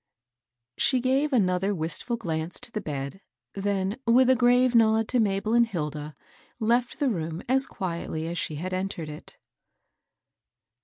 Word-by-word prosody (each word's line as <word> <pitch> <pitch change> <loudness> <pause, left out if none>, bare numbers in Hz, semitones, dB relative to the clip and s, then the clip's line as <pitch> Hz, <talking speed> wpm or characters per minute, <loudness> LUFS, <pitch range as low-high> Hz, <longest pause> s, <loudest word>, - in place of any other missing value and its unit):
She 260 - +3
gave 265 +4 +1
another 195 -4 +2
wistfiil 165 +9 -1
glance 165 -5 -3
to 250 -2 -8
the 215 - -3
bed, 140 +5 -5 0.3
then, 200 +2 -1
with 255 +2 +5
a - - +5
grave 245 +1 +4
nod 225 -1 +4
to 250 - +2
Mabel 210 0 +1
and 235 0 +5
Hilda, 150 -6 -4 0.4
left 235 +2 +1
the 285 - +2
room 165 -3 -4
as 265 +2 +3
quietly 170 -4 -4
as 170 +1 -3
she 155 - -2
had 185 +5 -4
entered 185 -4 -3
it. 150 0 -11
200 Hz, 150 wpm, -26 LUFS, 165-240 Hz, 0.4 s, with